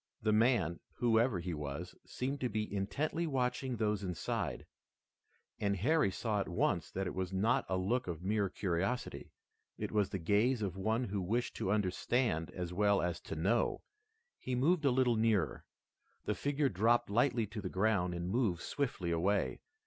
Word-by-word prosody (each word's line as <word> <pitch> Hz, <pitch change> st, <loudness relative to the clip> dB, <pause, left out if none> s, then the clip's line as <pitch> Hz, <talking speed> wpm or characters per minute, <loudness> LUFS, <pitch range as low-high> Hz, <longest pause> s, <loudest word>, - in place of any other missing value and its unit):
The 110 Hz, 0 st, +3 dB
man, 105 Hz, -7 st, +3 dB
whoever 115 Hz, -3 st, +2 dB
he 85 Hz, 0 st, -3 dB
was, 75 Hz, +3 st, -5 dB
seemed 135 Hz, +8 st, -3 dB
to 125 Hz, -, 0 dB
be 105 Hz, -1 st, -3 dB
intently 150 Hz, +12 st, -1 dB
watching 130 Hz, -2 st, -1 dB
those 105 Hz, -3 st, 0 dB
inside, 90 Hz, -4 st, -3 dB, 0.9 s
and 100 Hz, -1 st, +1 dB
Harry 150 Hz, -, +3 dB
saw 105 Hz, +2 st, -1 dB
at 100 Hz, -, -2 dB
once 85 Hz, -3 st, 0 dB
that 95 Hz, +6 st, -3 dB
it -, -, -3 dB
was 95 Hz, -1 st, -3 dB
not 100 Hz, +5 st, +1 dB
a 95 Hz, -, +1 dB
look 110 Hz, +7 st, 0 dB
of 85 Hz, -1 st, -5 dB
mere 100 Hz, 0 st, +1 dB
curiosity. 95 Hz, +8 st, -2 dB, 0.5 s
It -, -, -4 dB
was 105 Hz, -2 st, +2 dB
the -, -, -2 dB
gaze 105 Hz, +7 st, +2 dB
of 95 Hz, -3 st, -2 dB
one 110 Hz, +5 st, 0 dB
who 100 Hz, -4 st, -2 dB
wished 120 Hz, +7 st, -1 dB
to 95 Hz, -, -1 dB
understand 105 Hz, -2 st, +1 dB
as 90 Hz, -1 st, -5 dB
well 100 Hz, +1 st, +3 dB
as 85 Hz, -1 st, -1 dB
to 80 Hz, -, -6 dB
know. 100 Hz, +9 st, +1 dB, 0.6 s
He 130 Hz, -, -2 dB
moved 150 Hz, +5 st, +2 dB
a -, -, +6 dB
little 125 Hz, -2 st, +3 dB
nearer. 105 Hz, -10 st, +1 dB, 0.6 s
The -, -, +1 dB
figure 145 Hz, 0 st, 0 dB
dropped 115 Hz, +3 st, +2 dB
lightly 120 Hz, +1 st, +2 dB
to 105 Hz, +1 st, -6 dB
the -, -, -4 dB
ground 95 Hz, -3 st, +1 dB
and 85 Hz, 0 st, -3 dB
moved 100 Hz, -4 st, 0 dB
swiftly 115 Hz, -11 st, -2 dB
away. 95 Hz, +5 st, +1 dB
105 Hz, 170 wpm, -34 LUFS, 90-120 Hz, 0.9 s, a